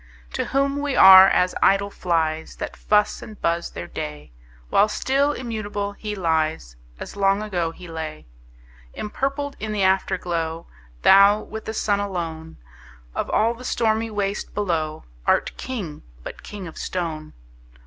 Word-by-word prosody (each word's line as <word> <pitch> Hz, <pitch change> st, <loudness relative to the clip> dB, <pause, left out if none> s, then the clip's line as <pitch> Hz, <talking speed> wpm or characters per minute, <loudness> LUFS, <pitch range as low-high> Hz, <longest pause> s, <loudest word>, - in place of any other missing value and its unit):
To -, -, -1 dB
whom 275 Hz, +1 st, 0 dB
we 290 Hz, -2 st, -1 dB
are 190 Hz, 0 st, +10 dB
as 180 Hz, -1 st, +2 dB
idle 200 Hz, +1 st, +3 dB
flies, 160 Hz, -4 st, -1 dB
That -, -, -6 dB
fuss 210 Hz, 0 st, +1 dB
and 215 Hz, -2 st, -11 dB
buzz 170 Hz, 0 st, 0 dB
their -, -, -7 dB
day; 75 Hz, -5 st, -7 dB, 0.4 s
While 205 Hz, -, +5 dB
still 275 Hz, +5 st, +1 dB
immutable 215 Hz, -6 st, -4 dB
he 210 Hz, +1 st, -6 dB
lies, 160 Hz, -, -1 dB, 0.2 s
As -, -, -8 dB
long 195 Hz, +1 st, +2 dB
ago 175 Hz, -6 st, -1 dB
he 180 Hz, +2 st, -11 dB
lay. 160 Hz, -2 st, -6 dB, 0.7 s
Empurpled 275 Hz, +6 st, -3 dB
in 215 Hz, 0 st, -4 dB
the 205 Hz, -2 st, 0 dB
Afterglow, 175 Hz, -3 st, 0 dB, 0.4 s
Thou, 200 Hz, +2 st, +7 dB
with 220 Hz, +1 st, -8 dB
the 220 Hz, -, -4 dB
Sun 205 Hz, -1 st, +1 dB
alone, 165 Hz, -5 st, -5 dB, 0.6 s
Of -, -, -3 dB
all 225 Hz, +2 st, +2 dB
the 240 Hz, +2 st, -12 dB
stormy 225 Hz, -2 st, 0 dB
waste 205 Hz, -1 st, -3 dB
below, 160 Hz, -6 st, -1 dB, 0.2 s
Art -, -, +2 dB
King, 200 Hz, -13 st, -5 dB, 0.2 s
but -, -, -8 dB
king 205 Hz, -3 st, -8 dB
of 165 Hz, -, -9 dB
stone! 160 Hz, -4 st, -4 dB
195 Hz, 150 wpm, -23 LUFS, 165-215 Hz, 0.7 s, are